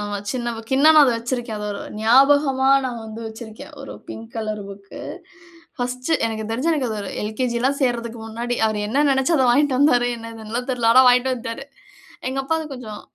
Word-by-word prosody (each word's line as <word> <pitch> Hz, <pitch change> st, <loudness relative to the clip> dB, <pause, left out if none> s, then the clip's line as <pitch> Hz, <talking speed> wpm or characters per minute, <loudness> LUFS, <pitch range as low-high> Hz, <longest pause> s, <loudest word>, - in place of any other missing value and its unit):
ஆமா. 205 Hz, 0 st, -3 dB
சின்ன 240 Hz, -2 st, -3 dB
புக். 225 Hz, +2 st, -8 dB
இன்னும் 310 Hz, +3 st, +6 dB
நான் 300 Hz, -, +9 dB
அத 250 Hz, -, +3 dB
வச்சிருக்கேன். 240 Hz, -1 st, -4 dB
அத 210 Hz, -, -5 dB
ஒரு 200 Hz, -, -6 dB, 0.2 s
ஞாபகமா 270 Hz, +3 st, +4 dB, 0.2 s
நான் 245 Hz, -3 st, -4 dB
வந்து 220 Hz, +1 st, -8 dB
வச்சிருக்கேன். 220 Hz, +4 st, -10 dB
ஒரு 275 Hz, -, -8 dB, 0.2 s
பிங்க் 225 Hz, 0 st, -8 dB
கலர் 215 Hz, -2 st, -3 dB
புக்கு. 200 Hz, 0 st, -11 dB, 0.8 s
பர்ஸ்ட் 250 Hz, +4 st, -3 dB, 0.2 s
எனக்கு 220 Hz, -1 st, -4 dB
தெரிஞ்சு, 255 Hz, +9 st, 0 dB
எனக்கு 280 Hz, -6 st, -1 dB
அது 215 Hz, -1 st, -3 dB
ஒரு 200 Hz, -, -6 dB
எல்.கே.ஜி 235 Hz, +3 st, -2 dB
எல்லாம் 275 Hz, +2 st, +1 dB
சேர்றதுக்கு 235 Hz, -2 st, -1 dB
முன்னாடி. 235 Hz, +2 st, -3 dB
அவர் 215 Hz, -1 st, -1 dB
என்ன 265 Hz, +8 st, +1 dB
நெனச்சு 265 Hz, +5 st, +2 dB
அத 265 Hz, -, +3 dB
வாங்கிட்டு 280 Hz, +1 st, +3 dB
வந்தாரு. 245 Hz, -4 st, +4 dB
என்னன்னு 230 Hz, -1 st, -9 dB
எல்லா 230 Hz, +3 st, -2 dB
தெரில. 240 Hz, -3 st, +1 dB
ஆனா 260 Hz, -, +8 dB
வாங்கிட்டு 250 Hz, +1 st, +3 dB
வந்துட்டாரு. 240 Hz, +1 st, -5 dB, 0.6 s
எங்க 265 Hz, +1 st, -3 dB
அப்பாவ 320 Hz, +2 st, -1 dB
கொஞ்சம் 220 Hz, -5 st, -8 dB
240 Hz, 190 wpm, -21 LUFS, 220-265 Hz, 0.8 s, நான்